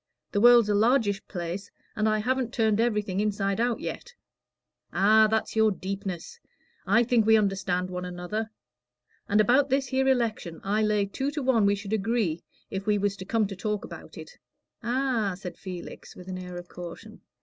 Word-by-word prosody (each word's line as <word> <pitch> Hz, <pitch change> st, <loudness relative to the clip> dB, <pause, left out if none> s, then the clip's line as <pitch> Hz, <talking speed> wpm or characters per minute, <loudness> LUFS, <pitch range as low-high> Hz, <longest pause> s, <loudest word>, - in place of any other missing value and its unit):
The 205 Hz, -, +1 dB
world's 240 Hz, -2 st, +7 dB
a 210 Hz, -, +2 dB
largish 215 Hz, -2 st, +2 dB
place, 175 Hz, +2 st, -5 dB, 0.3 s
and 215 Hz, 0 st, +1 dB
I 215 Hz, -, +2 dB
haven't 250 Hz, +2 st, -1 dB
turned 220 Hz, -3 st, +1 dB
everything 210 Hz, -5 st, 0 dB
inside 200 Hz, -1 st, 0 dB
out 240 Hz, -1 st, 0 dB
yet." 480 Hz, 0 st, -6 dB, 0.8 s
"Ah, 215 Hz, +2 st, +5 dB
that's 220 Hz, +1 st, -1 dB
your 220 Hz, 0 st, +5 dB
deepness. 195 Hz, -, -5 dB, 0.5 s
I 225 Hz, +5 st, +5 dB
think 235 Hz, -1 st, +3 dB
we 220 Hz, +1 st, +5 dB
understand 190 Hz, -3 st, 0 dB
one 180 Hz, 0 st, -4 dB
another. 180 Hz, +5 st, -4 dB, 0.8 s
And 210 Hz, -, +3 dB
about 255 Hz, +7 st, +4 dB
this 270 Hz, -1 st, +1 dB
here 265 Hz, +1 st, +1 dB
election, 230 Hz, -10 st, 0 dB
I 205 Hz, +2 st, +1 dB
lay 210 Hz, -1 st, +2 dB
two 265 Hz, +8 st, -3 dB
to 290 Hz, -1 st, -4 dB
one 235 Hz, -6 st, +3 dB
we 200 Hz, -, +3 dB
should 200 Hz, +1 st, -6 dB
agree 210 Hz, -6 st, 0 dB, 0.3 s
if 195 Hz, +2 st, -4 dB
we 210 Hz, -1 st, +3 dB
was 200 Hz, 0 st, 0 dB
to 190 Hz, -, -8 dB
come 220 Hz, +2 st, +1 dB
to 195 Hz, 0 st, -5 dB
talk 210 Hz, +1 st, -3 dB
about -, -, -11 dB
it." -, -, -11 dB, 0.4 s
"Ah!" 240 Hz, -5 st, 0 dB
said 180 Hz, -2 st, -7 dB
Felix, 180 Hz, -3 st, -9 dB
with 180 Hz, -, -12 dB
an 185 Hz, -1 st, -5 dB
air 180 Hz, -1 st, -7 dB
of 175 Hz, 0 st, -8 dB
caution. 175 Hz, -1 st, -10 dB
210 Hz, 180 wpm, -27 LUFS, 195-235 Hz, 0.8 s, world's